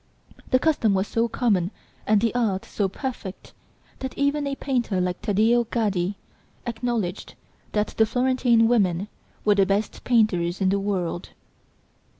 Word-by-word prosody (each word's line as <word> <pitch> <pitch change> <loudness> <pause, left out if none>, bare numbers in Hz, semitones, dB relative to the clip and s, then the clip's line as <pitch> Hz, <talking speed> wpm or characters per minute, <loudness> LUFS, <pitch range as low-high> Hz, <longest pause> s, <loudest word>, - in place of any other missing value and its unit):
The 255 - +5
custom 255 -8 +2
was 190 +2 0
so 230 +1 +1
common 205 -7 +1 0.4
and 215 -1 +4
the 230 -1 +1
art 215 -6 0
so 200 -2 -1
perfect 210 -4 -6 0.5
that 265 -1 -6
even 285 +1 +1
a 275 - -2
painter 245 -9 -1
like 180 0 -1
Taddeo 225 +3 +3
Gaddi 205 -5 -1 0.5
acknowledged 230 -5 -3 0.4
that 210 0 +1
the 220 - +2
Florentine 245 -2 +3
women 200 -4 +1 0.4
were 210 - +5
the 195 -1 +3
best 200 +2 -1
painters 190 -7 +2
in 190 -2 +2
the 200 +1 +1
world!... 185 -3 -2
215 Hz, 145 wpm, -24 LUFS, 195-240 Hz, 0.5 s, The